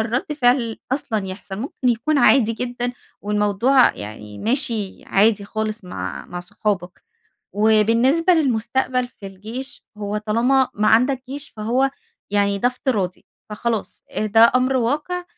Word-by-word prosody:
الرّد 235 Hz, +6 st, -1 dB
فعل 245 Hz, -5 st, +1 dB
أصلًا 220 Hz, -7 st, -1 dB
يحصل. 190 Hz, +1 st, -7 dB
ممكن 255 Hz, +1 st, -2 dB
يكون 245 Hz, +6 st, +1 dB
عادي 245 Hz, -5 st, +5 dB
جدًا 245 Hz, +1 st, -3 dB, 0.3 s
والموضوع 210 Hz, +5 st, +3 dB
يعني 105 Hz, 0 st, -8 dB
ماشي 225 Hz, -4 st, -2 dB
عادي 205 Hz, 0 st, +3 dB
خالص 215 Hz, 0 st, -4 dB
مع 180 Hz, -, -6 dB
مع 175 Hz, -, -6 dB
صحابك. 180 Hz, 0 st, -3 dB, 0.5 s
وبالنسبة 230 Hz, -, +3 dB
للمستقبل 255 Hz, -2 st, 0 dB
في 200 Hz, -, -12 dB
الجيش، 220 Hz, +8 st, -8 dB
هو 205 Hz, 0 st, -2 dB
طالما 240 Hz, +5 st, +2 dB
ما 210 Hz, +1 st, +2 dB
عندك 255 Hz, +4 st, +3 dB
جيش 285 Hz, +1 st, -7 dB
فهو 245 Hz, +6 st, +1 dB, 0.4 s
يعني 200 Hz, -1 st, +1 dB
ده 245 Hz, -, +3 dB
افتراضي 220 Hz, -8 st, -2 dB, 0.2 s
فخلاص. 220 Hz, 0 st, -3 dB
أ 215 Hz, -, -2 dB
ده 225 Hz, +2 st, +6 dB
أمر 255 Hz, +1 st, +2 dB
واقع 300 Hz, +9 st, -1 dB
230 Hz, 135 wpm, -21 LUFS, 210-260 Hz, 0.5 s, ده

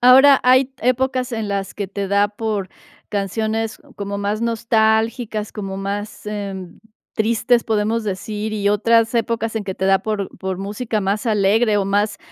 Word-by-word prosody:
Ahora, 265 Hz, +3 st, +7 dB
hay 255 Hz, +1 st, +4 dB
épocas 255 Hz, +1 st, +1 dB
en 220 Hz, -2 st, -2 dB
las 195 Hz, -1 st, -3 dB
que 205 Hz, -, -3 dB
te 200 Hz, 0 st, -4 dB
da 200 Hz, +1 st, +3 dB
por 205 Hz, -2 st, -3 dB, 0.4 s
canciones 220 Hz, +2 st, -2 dB, 0.2 s
como 200 Hz, 0 st, -4 dB
más 205 Hz, +2 st, -1 dB
nostálgicas, 220 Hz, -1 st, +1 dB
como 195 Hz, -2 st, -5 dB
más, 200 Hz, +2 st, -5 dB
eh, 205 Hz, -2 st, -4 dB, 0.6 s
tristes, 230 Hz, +2 st, +2 dB
podemos 220 Hz, +1 st, 0 dB
decir, 210 Hz, +2 st, -3 dB
y 205 Hz, -1 st, 0 dB
otras 230 Hz, +2 st, +3 dB
épocas 230 Hz, -1 st, 0 dB
en 215 Hz, -, -1 dB
que 190 Hz, -1 st, -4 dB
te 190 Hz, -, -3 dB
da 195 Hz, 0 st, +4 dB
por 210 Hz, -3 st, -2 dB
por 190 Hz, -1 st, -3 dB
música 210 Hz, +3 st, -2 dB
más 200 Hz, +3 st, -1 dB
alegre 215 Hz, +1 st, +3 dB
o 200 Hz, -, +1 dB
más 205 Hz, +2 st, 0 dB
215 Hz, 160 wpm, -20 LUFS, 200-230 Hz, 0.6 s, Ahora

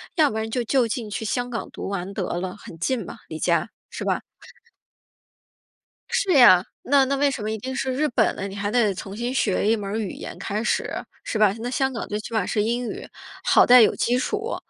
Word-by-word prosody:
要 310 Hz, -5 st, +4 dB
不 220 Hz, -, -4 dB
然 220 Hz, 0 st, -2 dB
就 245 Hz, +2 st, -1 dB
就 245 Hz, +1 st, +2 dB
近 225 Hz, -1 st, -4 dB
去 215 Hz, +2 st, -4 dB
香 245 Hz, +3 st, -1 dB
港 230 Hz, -2 st, -4 dB
读 -, -, -6 dB
完 195 Hz, 0 st, -4 dB
得 195 Hz, -, -2 dB, 0.2 s
了， 185 Hz, +1 st, -4 dB
很 170 Hz, -, -11 dB
近 230 Hz, +6 st, -1 dB
嘛， -, -, -9 dB
离 160 Hz, -, -6 dB
家， 170 Hz, +5 st, +1 dB, 0.2 s
是 -, -, -6 dB
吧？ -, -, 0 dB, 1.9 s
是 385 Hz, -2 st, +1 dB
呀， 210 Hz, -, +8 dB, 0.2 s
那 275 Hz, 0 st, +4 dB
那 275 Hz, +1 st, 0 dB
为 285 Hz, +1 st, +3 dB
什 260 Hz, -4 st, -4 dB
么 215 Hz, +1 st, -2 dB
一 220 Hz, -, -2 dB
定 260 Hz, +5 st, -5 dB
是 260 Hz, 0 st, -1 dB
日 300 Hz, +4 st, +1 dB
本 245 Hz, -, +1 dB
呢？ 195 Hz, -, -4 dB
你 195 Hz, -, -8 dB
还 205 Hz, 0 st, -2 dB
得 220 Hz, -4 st, +3 dB
重 195 Hz, +1 st, -7 dB
新 240 Hz, +3 st, -3 dB
学 205 Hz, -6 st, +1 dB
一 225 Hz, -, +4 dB
门 205 Hz, 0 st, -3 dB
语 205 Hz, -4 st, -3 dB
言 -, -, -8 dB
开 210 Hz, +2 st, -3 dB
始， 235 Hz, -, 0 dB, 0.3 s
是 -, -, -3 dB
吧？ 210 Hz, -2 st, +4 dB
那 240 Hz, -, -3 dB
香 265 Hz, +1 st, 0 dB
港 235 Hz, -, -5 dB
最 210 Hz, -, -3 dB
起 220 Hz, +2 st, -8 dB
码 215 Hz, -5 st, +1 dB
是 210 Hz, -, 0 dB
英 240 Hz, +2 st, -1 dB
语， -, -, -7 dB, 0.4 s
好 -, -, +5 dB
在 250 Hz, 0 st, +8 dB
有 -, -, +5 dB
基 245 Hz, +2 st, +1 dB
础。 425 Hz, -, -2 dB
225 Hz, 250 characters per minute, -24 LUFS, 205-255 Hz, 1.9 s, 呀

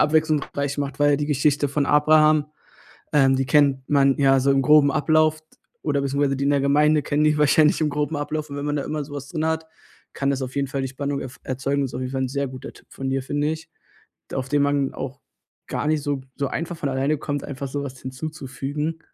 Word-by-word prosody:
abwechslungsreich 150 Hz, -2 st, +1 dB
macht, 140 Hz, -1 st, -3 dB
weil 145 Hz, -1 st, +4 dB
die 145 Hz, 0 st, -2 dB
Geschichte 145 Hz, 0 st, +1 dB
von 140 Hz, 0 st, 0 dB
Abraham, 155 Hz, 0 st, +4 dB, 0.7 s
ähm, 135 Hz, -2 st, +4 dB
die 135 Hz, -, 0 dB
kennt 135 Hz, -1 st, +3 dB
man 140 Hz, -2 st, +4 dB
ja 135 Hz, -1 st, +4 dB
so 135 Hz, +2 st, +2 dB
im 135 Hz, 0 st, +2 dB
groben 150 Hz, 0 st, +6 dB
Ablauf 155 Hz, 0 st, +2 dB
d 155 Hz, -, -41 dB, 0.4 s
oder 145 Hz, -2 st, 0 dB
beziehungsweise 140 Hz, 0 st, 0 dB
die 140 Hz, -, -2 dB
in 140 Hz, -, +2 dB
der 140 Hz, -1 st, +2 dB
Gemeinde 150 Hz, +2 st, +3 dB
kennen 145 Hz, +1 st, 0 dB
die 150 Hz, 0 st, +3 dB
wahrscheinlich 150 Hz, +1 st, +4 dB
im 155 Hz, -1 st, +1 dB
groben 150 Hz, +2 st, -2 dB
Ablauf 150 Hz, +1 st, -3 dB
und 140 Hz, -, -6 dB
wenn 145 Hz, -, -4 dB
man 145 Hz, 0 st, -1 dB
da 140 Hz, -, -1 dB
immer 150 Hz, -1 st, -3 dB
so 145 Hz, -, -13 dB
was 140 Hz, -1 st, -6 dB
drin 160 Hz, -1 st, -2 dB
hat, 160 Hz, 0 st, -1 dB, 0.5 s
kann 140 Hz, 0 st, 0 dB
das 135 Hz, -1 st, -1 dB
auf 130 Hz, +1 st, -6 dB
jeden 140 Hz, -1 st, 0 dB
Fall 135 Hz, +1 st, -3 dB
die 135 Hz, -, -2 dB
Spannung 140 Hz, +1 st, -3 dB
ef 130 Hz, +1 st, -8 dB
erzeugen. 135 Hz, +2 st, -1 dB
Das 135 Hz, -, -2 dB
ist -, -, -12 dB
auf 125 Hz, -, -3 dB
jeden 130 Hz, +1 st, -4 dB
Fall 130 Hz, 0 st, -1 dB
'n 130 Hz, -, -1 dB
sehr 140 Hz, +1 st, -2 dB
guter 130 Hz, 0 st, -9 dB
Tipp -, -, -19 dB
von 135 Hz, 0 st, -4 dB
dir, 135 Hz, 0 st, -1 dB
finde 145 Hz, +2 st, -1 dB
ich. 160 Hz, +1 st, -8 dB, 0.6 s
D -, -, -4 dB
auf 130 Hz, -1 st, -3 dB
den 145 Hz, 0 st, +2 dB
man 140 Hz, -1 st, +1 dB
auch 135 Hz, +1 st, -6 dB, 0.5 s
gar -, -, -2 dB
nicht 155 Hz, -1 st, +1 dB
so 145 Hz, -2 st, -2 dB
so 140 Hz, -, -1 dB
einfach 170 Hz, +1 st, -4 dB
von 145 Hz, -, -2 dB
alleine 135 Hz, +3 st, 0 dB
kommt, 145 Hz, -1 st, -3 dB
einfach 140 Hz, -1 st, -5 dB
so 140 Hz, +1 st, -3 dB
was 130 Hz, -2 st, -8 dB
hinzuzufügen. 150 Hz, +2 st, -5 dB
145 Hz, 240 wpm, -23 LUFS, 135-150 Hz, 0.7 s, groben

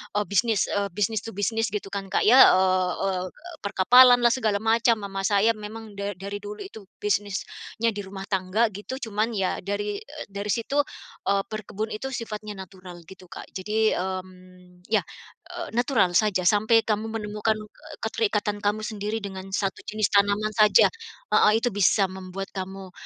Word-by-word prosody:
eee, 210 Hz, -, +2 dB
bisnis, 215 Hz, +1 st, +2 dB
eee, 200 Hz, 0 st, 0 dB
business 210 Hz, +1 st, 0 dB
to 225 Hz, -, -5 dB
business 225 Hz, +3 st, 0 dB
gitu 200 Hz, -1 st, -4 dB
kan, 200 Hz, -1 st, -4 dB
Kak, -, -, 0 dB
ya, 250 Hz, +5 st, +7 dB, 0.2 s
eee 185 Hz, -1 st, +2 dB
eee, 185 Hz, -2 st, -1 dB, 0.4 s
perkapalanlah, 240 Hz, +5 st, +6 dB
segala 220 Hz, -5 st, 0 dB
macam, 230 Hz, +1 st, +3 dB
mama 195 Hz, -1 st, -4 dB
saya 205 Hz, +2 st, +4 dB
memang 215 Hz, +1 st, -8 dB
da 200 Hz, 0 st, -3 dB
dari 200 Hz, +3 st, -6 dB
dulu 205 Hz, +1 st, -8 dB
itu 220 Hz, -, -11 dB, 0.2 s
bisnisnya 205 Hz, +2 st, -2 dB
di 205 Hz, -, -7 dB
rumah 190 Hz, 0 st, -8 dB
tangga 195 Hz, +4 st, +1 dB
gitu. 205 Hz, +6 st, -7 dB
Cuman 215 Hz, +3 st, -1 dB
ya 190 Hz, -2 st, -1 dB
dari, 205 Hz, +1 st, -3 dB
eee, 205 Hz, -9 st, -8 dB
situ, 235 Hz, +8 st, 0 dB, 0.5 s
eee, 195 Hz, 0 st, +2 dB
berkebun 215 Hz, 0 st, -4 dB
itu 215 Hz, +5 st, -4 dB
sifatnya 215 Hz, -2 st, -6 dB
natural 180 Hz, -2 st, -13 dB
gitu, 190 Hz, +1 st, -13 dB
Kak, -, -, -10 dB
jadi 215 Hz, +3 st, 0 dB
mmm, 185 Hz, -1 st, -8 dB
ya, 220 Hz, -, +2 dB, 0.5 s
eee, -, -, -6 dB
natural 240 Hz, -7 st, +2 dB
saja 205 Hz, -4 st, +1 dB
sampai 220 Hz, +3 st, +4 dB
kamu 215 Hz, 0 st, -1 dB
menemukan, 215 Hz, 0 st, -1 dB
eee, 215 Hz, -1 st, -12 dB
keterikatan 210 Hz, -, -1 dB
kamu 210 Hz, +1 st, 0 dB
sendiri 215 Hz, 0 st, -3 dB
dengan 190 Hz, -1 st, -6 dB
1 195 Hz, 0 st, -1 dB
jenis 210 Hz, 0 st, 0 dB
tanaman 205 Hz, +1 st, +2 dB
saja, 210 Hz, -2 st, +6 dB, 0.5 s
heeh, 210 Hz, -, +6 dB
itu 245 Hz, -, +1 dB
bisa 200 Hz, 0 st, +3 dB
membuat 190 Hz, +1 st, -7 dB
kamu 190 Hz, -1 st, -7 dB
205 Hz, 160 wpm, -25 LUFS, 195-220 Hz, 0.5 s, ya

